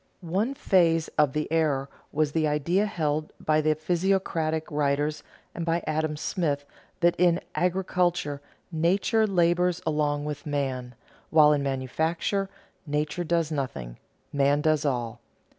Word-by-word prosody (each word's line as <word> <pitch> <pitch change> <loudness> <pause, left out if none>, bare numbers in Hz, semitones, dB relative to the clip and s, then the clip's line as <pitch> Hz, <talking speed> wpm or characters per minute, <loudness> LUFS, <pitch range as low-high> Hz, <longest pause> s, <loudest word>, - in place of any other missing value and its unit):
One 225 +8 +1
phase 165 - +3
of 150 -3 +2
the 150 0 -1
error 150 -4 +1 0.2
was 150 0 +1
the 155 0 +1
idea 170 +8 +1
held 155 -6 -2
by 155 0 +2
the 155 0 +2
physiocratic 165 -1 0
writers 145 +1 0 0.3
and 170 - -4
by 165 0 0
Adam 155 0 -1
Smith 145 -4 -1 0.4
that 175 0 +4
in 175 -1 +4
agriculture 180 -5 0 0.3
"nature 190 +7 +2
labors 175 -1 +2
along 150 -2 0
with 150 0 -5
man," 130 -4 -2 0.3
while 150 -1 +6
in 145 - +1
manufacture 160 +9 -1 0.4
"nature 150 +4 -1
does 165 -2 0
nothing, 95 - -4 0.4
man 140 +1 +3
does 155 -1 +2
all." 120 -4 -2
155 Hz, 130 wpm, -26 LUFS, 145-175 Hz, 0.4 s, while